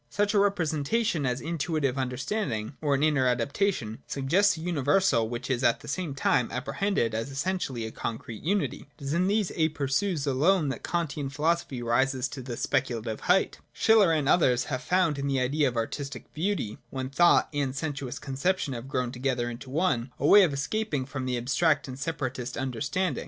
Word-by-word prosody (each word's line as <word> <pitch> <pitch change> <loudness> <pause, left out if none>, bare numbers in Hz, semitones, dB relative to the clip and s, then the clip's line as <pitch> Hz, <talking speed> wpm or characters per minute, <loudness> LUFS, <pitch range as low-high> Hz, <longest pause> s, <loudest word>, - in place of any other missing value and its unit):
Such 205 +1 0
a 205 - +4
representation, 175 - +1
as 125 +1 -1
an - - -9
Intuitive 155 -5 -1
Understanding, 130 - -2
or 145 -2 +2
an 135 - 0
inner 145 -4 +3
adaptation, 125 - 0
suggests 170 +8 +2
a - - -7
universal 150 -6 +2
which 120 +1 -5
is 130 -1 -1
at 120 - +3
the - - -12
same 160 -2 -3
time 125 -3 +2
apprehended 130 - -1
as 115 +4 -2
essentially 140 -5 -2
a 110 - -5
concrete 115 -1 -5
unity. 195 -2 -1
It - - -13
is 140 +2 -2
in 180 +2 +2
these 205 -1 +1
aperjus 155 +2 0
alone 150 +4 +2
that 135 - -4
the - - -6
Kantian 150 -5 -2
philosophy 150 -3 -1
rises 130 +2 +1
to 145 -2 -7
the 120 -2 -6
speculative 120 -5 -1
height. 185 +2 +2
Schiller, 215 -6 +5
and 150 -4 +1
others, 125 -7 +4
have 130 - -1
found 170 -1 +1
in 140 - -2
the 135 -1 +1
idea 140 +3 +2
of 120 -2 -3
artistic 135 +3 -4
beauty, 160 - -2
where 130 0 -4
thought 170 +6 +4
and 140 -2 -1
sensuous 140 -4 -4
conception 140 +3 -1
have 120 +1 -6
grown 125 -2 -1
together 125 -2 -1
into 120 +2 -9
one, 130 -5 0
a 140 - -2
way 205 +7 +8
of 180 -6 +4
escape 185 +7 -2
from 135 -2 -4
the 125 -1 0
abstract 140 +6 +1
and 130 0 -7
separatist 135 -5 -3
under 130 -4 -3
standing. 170 0 0
140 Hz, 190 wpm, -27 LUFS, 125-170 Hz, -, way